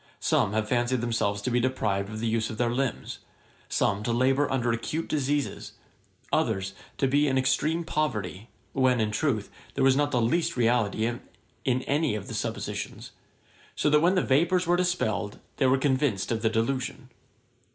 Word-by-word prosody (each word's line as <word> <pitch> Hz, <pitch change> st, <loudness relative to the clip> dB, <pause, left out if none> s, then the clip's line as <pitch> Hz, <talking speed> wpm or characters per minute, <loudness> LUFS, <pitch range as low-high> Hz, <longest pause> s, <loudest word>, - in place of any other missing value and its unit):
Some 100 Hz, -, +1 dB
have 110 Hz, 0 st, 0 dB
fancied 120 Hz, +2 st, +1 dB
themselves 105 Hz, -3 st, -1 dB
to 125 Hz, -, -1 dB
be 120 Hz, -, +3 dB
deprived 105 Hz, -6 st, 0 dB
of 110 Hz, 0 st, -6 dB
the 115 Hz, -, -1 dB
use 110 Hz, 0 st, 0 dB
of 110 Hz, -, -6 dB
their 120 Hz, 0 st, +1 dB
limbs, 135 Hz, -1 st, -2 dB, 0.5 s
some 100 Hz, +1 st, +1 dB
to 115 Hz, -, -1 dB
labour 130 Hz, +4 st, +2 dB
under 120 Hz, -3 st, +1 dB
acute 150 Hz, +8 st, -2 dB
diseases, 145 Hz, -1 st, -1 dB, 0.6 s
others 95 Hz, 0 st, 0 dB, 0.2 s
to 135 Hz, -, +2 dB
be 145 Hz, +3 st, +3 dB
in 130 Hz, -1 st, +1 dB
extreme 145 Hz, +6 st, +1 dB
poverty; 110 Hz, -, -2 dB, 0.2 s
when, 130 Hz, -2 st, +3 dB
in 110 Hz, -1 st, +1 dB
truth, 110 Hz, -3 st, -1 dB, 0.2 s
there 135 Hz, -, +1 dB
was 135 Hz, 0 st, +5 dB
not 145 Hz, +1 st, +2 dB
the 125 Hz, -, +1 dB
least 130 Hz, +7 st, +1 dB
reality 115 Hz, -3 st, +2 dB
in 120 Hz, +2 st, -4 dB
any 145 Hz, -3 st, +1 dB
of 105 Hz, -, -6 dB
the -, -, -6 dB
suppositions; -, -, -4 dB, 0.6 s
so 150 Hz, -, +1 dB
that 150 Hz, -, +6 dB
when 180 Hz, +3 st, +4 dB
the 185 Hz, -, +2 dB
vapours 175 Hz, +7 st, +2 dB
were 175 Hz, +1 st, +3 dB
dispelled, 175 Hz, -, -1 dB, 0.2 s
they 135 Hz, -, +3 dB
were 130 Hz, +1 st, +4 dB
convinced 130 Hz, -8 st, 0 dB
of 110 Hz, -1 st, -1 dB
the 110 Hz, -, +2 dB
delusion. 125 Hz, +3 st, -2 dB
125 Hz, 175 wpm, -27 LUFS, 110-140 Hz, 0.6 s, that